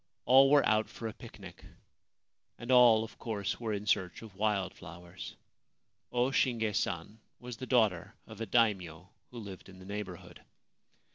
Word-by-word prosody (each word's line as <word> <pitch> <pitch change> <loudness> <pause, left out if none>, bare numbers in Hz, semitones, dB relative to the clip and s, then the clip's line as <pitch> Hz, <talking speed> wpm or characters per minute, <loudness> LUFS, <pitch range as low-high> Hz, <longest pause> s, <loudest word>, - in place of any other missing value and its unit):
All 135 +3 +7
were 145 0 +5
out 110 0 +2
for 115 - -6
a 110 - -6
picnic, - - -12 0.9
and 120 +2 -5
all, 120 -3 +7
of 110 - -11
course, 105 -4 -3
were 115 -2 -3
in 105 0 -3
search 95 0 0
of 110 -3 -11
wild 100 -3 0
flowers. 85 +1 -10 0.8
O 125 +2 +1
Shinge 115 -5 +1
San 95 +4 -2 0.2
was 120 -2 -8
the 130 - -7
daughter 110 -9 +1
of 110 0 -11
a 115 - -3
Daimio 95 -6 +1 0.2
who 125 - -11
lived 100 -4 -9
in 95 - -13
the 95 - -13
neighbourhood. 100 -3 -7
110 Hz, 160 wpm, -31 LUFS, 95-120 Hz, 0.9 s, All